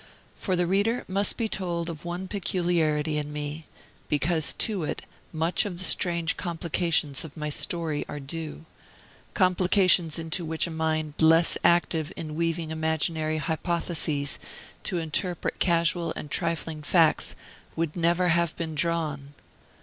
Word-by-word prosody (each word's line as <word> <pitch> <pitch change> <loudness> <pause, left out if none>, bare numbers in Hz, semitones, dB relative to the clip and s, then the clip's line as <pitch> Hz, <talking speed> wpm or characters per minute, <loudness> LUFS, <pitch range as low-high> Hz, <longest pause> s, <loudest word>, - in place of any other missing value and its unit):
For 185 - -1
the 175 0 +2
reader 205 +7 +1
must 200 +2 +1
be 230 - 0
told 175 -5 -2
of 165 -3 -5
one 175 +2 -4
peculiarity 165 -6 0
in 150 0 -5
me, 150 +1 -5 0.4
because 155 +2 +2
to 205 -6 +1
it 150 - -3 0.3
much 165 +1 +2
of 195 -4 -5
the 185 - -3
strange 170 -2 +2
complications 165 -4 0
of 160 -1 -11
my 150 -1 -3
story 160 -1 +1
are 145 - -5
due; 160 +2 -6 0.7
complications 185 -3 +3
into 165 +2 -2
which 160 0 +2
a 170 - -5
mind 155 -1 -1
less 165 +1 +5
active 170 -2 +2
in 155 -2 -6
weaving 165 0 -1
imaginary 160 0 0
hypotheses 155 -2 -1 0.4
to 180 - -2
interpret 170 +2 -2
casual 170 -1 +2
and 150 - -7
trifling 165 -2 -2
facts 160 0 +3 0.4
would 165 -2 -2
never 175 +1 +2
have 170 -1 +1
been 160 -1 -3
drawn. 150 -3 -1
165 Hz, 140 wpm, -26 LUFS, 155-175 Hz, 0.7 s, less